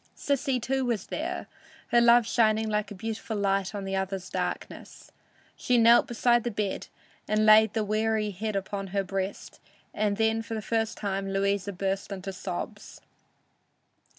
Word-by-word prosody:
Sissy, 275 -2 0
too, 265 +3 -1
was 235 -6 -1
there, - - -4 0.4
her 240 - +5
love 235 0 +6
shining 220 -1 +2
like 210 -1 -1
a 205 - -8
beautiful 220 +2 -4
light 195 0 0
on 200 -1 -4
the 195 0 -2
other's 190 -1 -3
darkness. - - -5 0.4
She 250 - +1
knelt 235 +3 +6
beside 240 -1 +2
the 240 - -1
bed 205 -3 -3 0.4
and 215 0 +2
laid 215 0 +7
the 220 - +1
weary 215 0 0
head 210 +2 -3
on 195 -1 -3
her 195 +1 -1
breast, 195 +1 -5 0.3
and 205 -1 0
then 220 0 +2
for 225 0 -6
the 220 - -3
first 225 0 -1
time 195 -1 -2
Louisa 200 0 0
burst 195 +1 -3
into 195 0 -5
sobs. 190 +3 -6
215 Hz, 160 wpm, -27 LUFS, 195-225 Hz, 0.4 s, laid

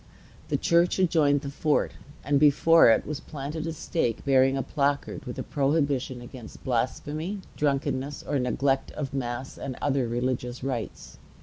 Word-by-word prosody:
The - - 0
church 170 +1 +3
adjoined 155 -6 +3
the 140 -1 -5
fort; 150 +1 +1 0.3
and 140 0 +2
before 150 +1 +6
it 115 - +3
was 150 -1 -4
planted 150 +2 -5
a - - -2
stake 135 -7 -2
bearing 135 0 +4
a 135 - -1
placard 140 0 -1
with 125 - -6
a - - -3
prohibition 140 -3 0
against 120 -2 -11
blasphemy, 150 - -2
drunkenness, 140 -1 -1
or 145 - -1
neglect 135 +2 0
of 140 -3 -5
mass 130 -1 -4
and 130 - -5
other 135 -3 +1
religious 125 +1 -2
rites. 125 -5 -5
140 Hz, 150 wpm, -27 LUFS, 130-150 Hz, 0.3 s, before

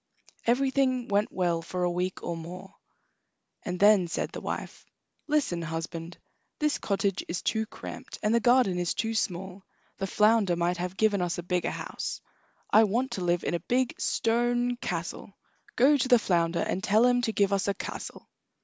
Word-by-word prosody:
Everything 260 0 +2
went 205 +1 +1
well 175 -3 0
for 180 +2 -4
a 175 - +1
week 180 +1 -3
or 170 - -3
more, 180 +4 -9 0.9
and 180 0 -4
then 205 -3 +6
said 165 - -3
the - - -7
wife: - - -5 0.4
"Listen, 290 - +1
husband; 165 +1 -5 0.4
this 300 -1 0
cottage 200 -1 -1
is 175 - -3
too 220 -1 0
cramped, 255 - -9
and 210 +1 +2
the 235 - +4
garden 240 -7 +3
is 175 -1 -1
too 225 +1 -1
small. 190 -2 -3 0.4
The 195 - -1
flounder 210 -2 +3
might 170 +1 0
have 180 +1 -4
given 210 -3 +2
us 175 -1 -1
a 175 - -4
bigger 180 0 0
house. - - -5 0.5
I 220 +1 +7
want 240 +5 -1
to 190 -6 -3
live 175 -1 +1
in - - -1
a 170 - 0
big 250 +8 0
stone 240 +1 +1
castle. 180 0 -5 0.4
Go 280 +5 +5
to 255 - 0
the 250 -1 +7
flounder, 170 -5 +1
and 190 - -2
tell 215 +4 +4
him 245 0 +3
to 230 - 0
give 200 -2 +2
us 195 0 0
a 200 - +1
castle." - - -7
195 Hz, 180 wpm, -28 LUFS, 175-235 Hz, 0.9 s, I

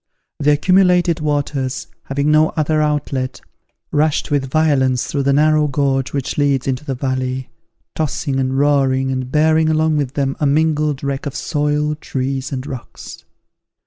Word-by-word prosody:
The 145 - +2
accumulated 180 +1 +3
waters, 145 -3 -2 0.2
having 140 +2 0
no 155 +1 +4
other 155 0 +1
outlet, 145 -4 -1 0.5
rushed 155 0 +1
with 135 -2 0
violence 130 -4 +2
through 140 - -2
the 140 0 +2
narrow 150 +1 +3
gorge 135 -2 0
which 140 +1 -3
leads 140 -2 +1
into 130 +1 -2
the 135 -3 -3
valley, 130 0 -3 0.4
tossing 140 -3 -2
and 130 0 -1
roaring, 135 -2 +2
and 130 -1 -3
bearing 155 +1 +3
along 155 0 +2
with 140 -1 -2
them 135 -1 -1
a 150 - +2
mingled 150 -1 +1
wreck 140 +1 -3
of 140 - -6
soil, 150 0 0
trees, 135 -2 -4
and 130 -1 -4
rocks. 130 -4 -9
145 Hz, 150 wpm, -18 LUFS, 135-150 Hz, 0.5 s, no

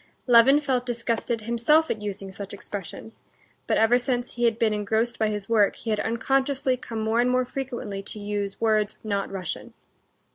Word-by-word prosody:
(Levin 250 +4 +6
felt 265 -4 0
disgusted 235 -1 -2
himself 235 +8 +2
at 215 - -3
using 195 -2 -5
such 200 +1 -7
expressions, 205 +3 -8 0.5
but - - +2
ever 230 +3 +4
since 245 -1 -2
he 240 0 0
had 230 -1 +2
been 225 -2 +2
engrossed 220 +3 -1
by 220 - +2
his 210 -2 -3
work, 215 -3 +3
he 225 - -4
had 210 - 0
unconsciously 265 +4 +1
come 230 -3 -6
more 220 +2 +2
and 245 - +2
more 255 0 +2
frequently 240 -7 -5
to 205 +2 -8
use 205 -1 -3
words 215 -2 +1
not 200 -2 -2
Russian.) 185 -3 -5
225 Hz, 180 wpm, -25 LUFS, 210-245 Hz, 0.5 s, Levin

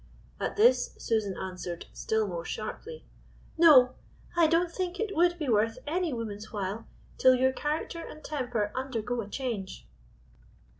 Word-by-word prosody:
At - - -2
this 460 +4 +4
Susan 215 -4 -1
answered 180 -2 -5
still 220 -1 0
more 170 -3 -4
sharply, 435 - -6 0.5
"No, 280 -7 +7 0.4
I 340 -2 +5
don't 335 +2 +2
think 365 +1 -3
it 435 -3 -2
would 345 +1 +3
be 305 -4 -3
worth 225 0 +2
any 340 +2 -1
woman's 220 -3 -5
while, 205 +1 -4 0.3
till 255 0 +7
your 260 +1 +3
character 305 +4 -3
and 310 -2 -9
temper 245 -8 -2
undergo 245 -2 -2
a 200 - -7
change." 225 -7 -4
255 Hz, 145 wpm, -29 LUFS, 215-330 Hz, 0.5 s, No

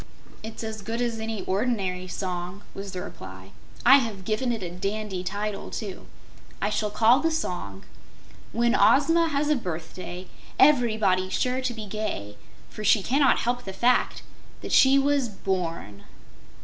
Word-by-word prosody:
"It's 220 +1 -7
as 220 -1 -5
good 225 +3 -4
as 235 -2 -1
any 220 -1 -4
ordinary 190 -3 -1
song," 180 +1 -5
was 195 0 -7
the 180 -1 -5
reply. 95 0 -10 0.3
"I 265 +3 +9
have 220 -8 -3
given 220 +4 0
it 225 -4 -3
a 175 - -5
dandy 195 +1 -3
title, 205 +2 -4
too. 200 -4 -6 0.5
I 205 - -1
shall 210 0 0
call 230 +4 +4
the 325 +2 +1
song: 175 - -4 0.7
'When 235 +1 +2
Ozma 330 +6 +4
Has 290 0 0
a 300 - +4
Birthday, 180 - -6 0.3
Everybody's 220 -9 +3
Sure 255 +1 0
to 255 -1 -2
Be 220 -1 -6
Gay, 195 - -4 0.3
for 215 - -9
She 205 -1 +4
Cannot 275 +4 +3
Help 245 +1 -1
the 195 - -6
Fact 245 +5 +1 0.4
That - - -6
She 270 +1 +6
Was 275 -3 +2
Born.'" 170 - -4
215 Hz, 155 wpm, -26 LUFS, 185-245 Hz, 0.7 s, I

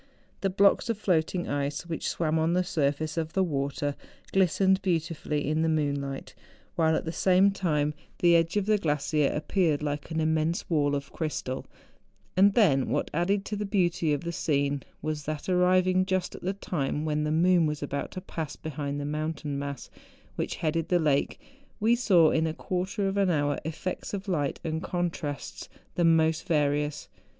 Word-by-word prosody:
Tlie 195 0 -2
blocks 200 +4 +4
of 230 - 0
floating 175 -2 0
ice 145 +3 -2
which 165 -2 -3
swam 160 -1 0
on 160 +2 +2
the 180 +1 +2
surface 155 -1 -1
of 160 -1 -2
the 190 - +2
water 145 -2 -1 0.4
glistened 190 +1 +3
beautifully 165 -5 -1
in 155 +1 +1
the 160 - +2
moonlight; 140 -3 -2 0.4
while 160 -1 +3
at - - -2
the 160 - -2
same 185 +3 +4
time 150 -6 0 0.2
the 175 -1 +5
edge 165 +3 +2
of 205 - +1
the 210 0 +3
glacier 150 -3 +1
appeared 155 -1 0
like 145 0 -3
an 160 -1 -2
immense 160 +1 0
wall 145 -3 +2
of 140 -1 -5
crystal, 145 -5 -3 0.7
and 195 +2 +5
then 145 - +4
what - - -1
added 195 +5 +1
to 210 - -3
the 210 - -2
beauty 180 -5 +1
of 145 -1 0
the 170 - -3
scene 140 -3 0 0.2
was, 155 -1 -3
that 155 -1 -4
arriving 185 0 +3
just 185 -1 -1
at - - -9
the 190 +2 -1
time 155 -6 -2
when 150 -1 0
the 150 - -1
moon 170 +1 +4
was 150 -1 -3
about 140 0 -3
to 185 - -7
pass 160 -5 -5
behind 145 -2 -4
the 145 - -3
mountain 150 -1 -3
mass 140 -2 -6 0.4
which - - -2
headed 165 0 -1
the 180 - +4
lake 150 -4 +1 0.4
we 225 +2 +4
saw 185 -10 +4
in 160 0 +2
a 160 - -3
quarter 190 +4 -2
of 195 +1 -2
an 195 -2 +3
hour 145 -3 +1
effects 165 +5 -4
of 200 +1 -6
light 150 -7 -1
and 160 0 -2
contrasts 170 -5 -4 0.2
the 175 - 0
most 160 0 +3
various. 150 -2 0
160 Hz, 180 wpm, -28 LUFS, 150-185 Hz, 0.7 s, the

